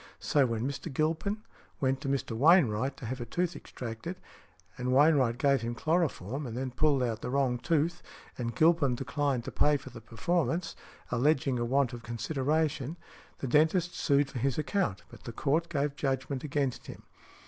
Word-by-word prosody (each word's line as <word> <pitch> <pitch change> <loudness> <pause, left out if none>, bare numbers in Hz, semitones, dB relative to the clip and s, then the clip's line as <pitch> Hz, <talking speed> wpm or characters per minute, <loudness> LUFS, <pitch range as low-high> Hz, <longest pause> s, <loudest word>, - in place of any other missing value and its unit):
So, 140 -3 +2
when 115 +1 -1
Mr. 140 +3 -5
Gilpin 165 +9 -1 0.4
went 135 0 0
to 140 - -4
Mr. 140 -3 -1
Wainwright 135 - +4
to - - -8
have 130 +2 -4
a - - -3
tooth 175 +7 -1
extracted, 125 +9 -7 0.6
and 125 0 -2
Wainwright 135 -4 +4
gave 140 -1 +3
him 120 +1 -3
chloroform, 145 - -1
and 115 0 -6
then 130 0 -3
pulled 140 0 +2
out 115 -2 -2
the - - -4
wrong 130 -2 +1
tooth, 165 +5 0 0.3
and 120 -2 -4
Gilpin 155 -6 +4
declined 140 -1 -1
to - - -5
pay 150 0 +3
for 130 - -11
the 115 -1 -10
performance, 170 +9 -1 0.4
alleging 135 0 +2
a 120 - 0
want 130 +1 +1
of 120 - -7
consideration, 145 +5 -1 0.4
the 135 - -4
dentist 160 +6 +3
sued 140 -2 +2
for 125 - -4
his 135 +1 0
account, 155 - -1
but - - -14
the 120 - -5
Court 150 +8 0
gave 145 -2 -1
judgment 135 -1 -2
against 140 -3 -2
him. - - -10
140 Hz, 175 wpm, -30 LUFS, 125-155 Hz, 0.6 s, Wainwright